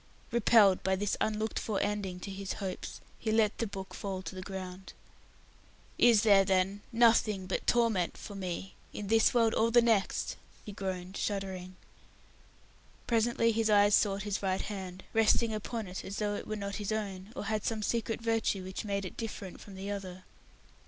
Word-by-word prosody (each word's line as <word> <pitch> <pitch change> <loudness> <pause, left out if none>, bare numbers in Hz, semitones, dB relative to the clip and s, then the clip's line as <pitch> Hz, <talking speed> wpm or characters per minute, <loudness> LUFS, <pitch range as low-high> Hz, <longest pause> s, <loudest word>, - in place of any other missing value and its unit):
Repelled 220 -4 +5
by 190 0 +1
this 205 +1 -1
unlooked 215 0 0
for 210 -3 -2
ending 200 -3 -2
to 200 - -6
his 195 0 -4
hopes, 190 -2 -6 0.2
he 220 - -1
let 220 -1 +2
the 230 - 0
book 195 -1 -7
fall 190 -2 -4
to - - -6
the 185 - -6
ground. 190 0 -7 1.1
"Is 235 -3 +6
there, 200 -3 +6
then, 190 +1 +1
nothing 225 -4 +4
but 185 - -3
torment 230 -7 +2
for 205 - -8
me 190 -1 -5 0.2
in 205 -1 -5
this 225 0 +5
world 230 -3 +3
or 225 +1 +3
the 240 +1 +6
next?" 225 -4 +1 0.3
he 210 - -6
groaned, 190 -1 -5
shuddering. 190 -2 -3 1.3
Presently 230 0 +2
his 225 0 +1
eyes 205 0 +5
sought 200 -2 +3
his 205 -1 -2
right 190 -1 0
hand, 190 -3 -6
resting 225 +1 +3
upon 215 +1 -4
it 185 0 -6
as 200 - -6
though 210 -1 0
it - - -5
were 215 - -2
not 200 -1 -4
his 210 0 -3
own, 200 -2 -4
or 240 - -4
had 215 -1 -1
some 220 -2 -1
secret 225 0 -1
virtue 225 -4 0
which 190 +3 -5
made 200 -2 -2
it 185 - -7
different 205 -5 -6
from 200 - -11
the 195 +2 -5
other. 185 -2 -6
205 Hz, 180 wpm, -31 LUFS, 190-220 Hz, 1.3 s, Is